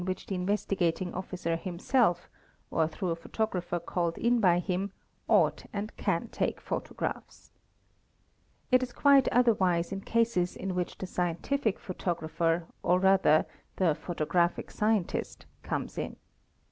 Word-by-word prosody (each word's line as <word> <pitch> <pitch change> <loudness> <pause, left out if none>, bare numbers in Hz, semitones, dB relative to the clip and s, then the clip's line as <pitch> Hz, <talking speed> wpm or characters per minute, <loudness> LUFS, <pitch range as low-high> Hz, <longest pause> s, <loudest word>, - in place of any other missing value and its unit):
which 185 +1 -3
the - - -4
Investigating 185 -2 0
Officer 180 -2 -3
himself, 180 +2 +1 0.4
or 160 -1 +2
through 180 +3 -4
a - - 0
photographer 180 0 -2
called 170 0 -2
in 240 +1 +2
by 180 -5 +4
him, 185 +2 -1 0.4
ought - - +3
and 210 +1 -4
can - - -1
take - - -1
photographs. - - -5 1.2
It 255 0 +6
is 250 -1 -4
quite 280 -2 +5
otherwise 190 -9 +3
in 195 0 -4
cases 230 -6 +1
in 190 0 -3
which 180 -1 -3
the - - -5
scientific 185 +7 -1
photographer 165 -2 -1 0.2
or 180 +1 +3
rather 190 -5 +4 0.3
the 175 -5 +3
photographic 170 +2 -1
scientist 215 -3 -1 0.2
comes - - -3
in. - - -4
185 Hz, 130 wpm, -29 LUFS, 170-205 Hz, 1.2 s, It